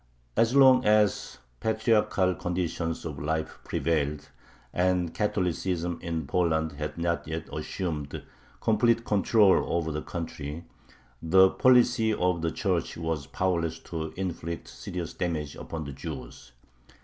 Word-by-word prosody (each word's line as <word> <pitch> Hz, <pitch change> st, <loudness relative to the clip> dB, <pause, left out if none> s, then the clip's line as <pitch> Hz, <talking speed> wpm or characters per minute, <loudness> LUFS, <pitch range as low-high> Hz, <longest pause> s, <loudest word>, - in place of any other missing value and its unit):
As 115 Hz, +3 st, +3 dB
long 130 Hz, -2 st, +7 dB
as 105 Hz, -1 st, +2 dB, 0.2 s
patriarchal 110 Hz, -4 st, +2 dB
conditions 85 Hz, -2 st, -3 dB
of 75 Hz, -4 st, -5 dB
life 80 Hz, +2 st, -2 dB
prevailed, 75 Hz, -2 st, -1 dB, 0.4 s
and 90 Hz, -2 st, +1 dB
Catholicism 90 Hz, -4 st, -1 dB
in 80 Hz, -3 st, -3 dB
Poland 80 Hz, 0 st, +1 dB
had 75 Hz, +2 st, -5 dB
not 85 Hz, -1 st, -1 dB
yet 80 Hz, +1 st, -4 dB
assumed 75 Hz, -2 st, -4 dB, 0.4 s
complete 115 Hz, +1 st, +2 dB
control 105 Hz, -1 st, +4 dB
over 85 Hz, -1 st, 0 dB
the 75 Hz, 0 st, -3 dB
country, 80 Hz, -2 st, -6 dB, 0.6 s
the 95 Hz, +3 st, +6 dB
policy 125 Hz, -3 st, +4 dB
of 90 Hz, -3 st, +1 dB
the 85 Hz, -, +1 dB
Church -, -, -1 dB
was 80 Hz, -4 st, -3 dB
powerless 85 Hz, +1 st, -1 dB
to 80 Hz, -1 st, -5 dB
inflict 85 Hz, -3 st, -4 dB
serious 90 Hz, -2 st, -6 dB
damage 80 Hz, -5 st, -3 dB
upon 80 Hz, -1 st, -6 dB
the 70 Hz, -1 st, -7 dB
Jews. 65 Hz, -3 st, -8 dB
85 Hz, 125 wpm, -28 LUFS, 80-95 Hz, 0.6 s, long